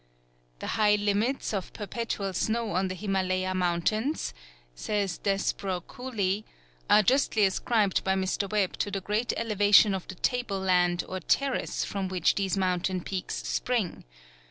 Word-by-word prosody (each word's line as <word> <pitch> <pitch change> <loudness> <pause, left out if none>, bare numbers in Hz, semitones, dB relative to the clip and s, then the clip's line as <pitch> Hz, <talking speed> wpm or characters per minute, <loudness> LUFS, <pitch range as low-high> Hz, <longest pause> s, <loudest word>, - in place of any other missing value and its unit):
"The - - -7 0.2
high 210 -1 +5
limits 210 +5 0
of 195 -3 -3
perpetual 205 -2 -3
snow 225 +3 -1
on 185 +2 +1
the 185 - -4
Himalaya 185 -1 -1
mountains," 185 - 0 0.4
says 200 - -2
Desborough 195 -2 -1
Cooley, 210 -3 -2 0.5
"are 210 - +6
justly 245 -3 +3
ascribed 200 +1 +1
by 190 0 +1
Mr. 190 +1 -1
Webb 205 -3 0
to - - 0
the 200 -1 -2
great 210 +5 0
elevation 205 -2 +5
of 190 -2 -4
the 185 - -7
table 240 -1 -1
land 180 -2 +2
or 185 - -4
terrace 270 +9 0
from 195 -1 -3
which 185 -3 +2
these 195 -1 -1
mountain 185 -1 0
peaks 185 +1 -4
spring. 235 -8 -1
195 Hz, 145 wpm, -28 LUFS, 185-215 Hz, 0.5 s, are